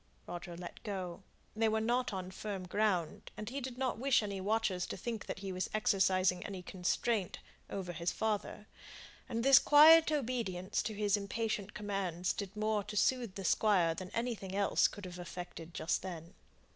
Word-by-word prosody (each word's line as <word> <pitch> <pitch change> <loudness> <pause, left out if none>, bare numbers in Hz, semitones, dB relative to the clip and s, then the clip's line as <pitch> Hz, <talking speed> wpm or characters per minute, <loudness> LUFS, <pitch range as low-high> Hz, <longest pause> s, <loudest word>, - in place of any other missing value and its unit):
Roger 175 0 -7
let 175 0 -9
go; 190 -4 -5 0.3
they 220 0 +2
were 220 0 +1
now 240 +3 +1
on 185 -2 -5
firm 195 -1 -5
ground, 185 -4 0
and 215 - -5
he 275 +1 -3
did 250 -1 -6
not 255 -3 -1
wish 265 -3 +3
any 200 -2 -4
watchers 200 -3 0
to - - -5
think 225 +2 -5
that - - -4
he 190 - -3
was 185 0 -2
exercising 185 -3 +2
any 190 -3 -6
constraint 190 +3 -1 0.3
over 180 -3 -4
his 170 +1 -1
father; 215 -1 -2 0.6
and 230 0 -1
this 275 -1 +9
quiet 315 +2 +8
obedience 230 -10 -1
to 215 - -4
his 205 -1 +2
impatient 210 0 -3
commands 195 -4 -2
did 200 0 -6
more 215 -1 +1
to 210 +1 -6
soothe 240 -4 +1
the 195 - -5
Squire 180 -5 +3
than 185 +2 -7
anything 230 -5 -3
else 200 0 +3
could 205 - -9
have 180 0 -8
effected 175 -1 -7
just 165 - -1
then. 170 -3 -7
200 Hz, 175 wpm, -34 LUFS, 185-220 Hz, 0.6 s, this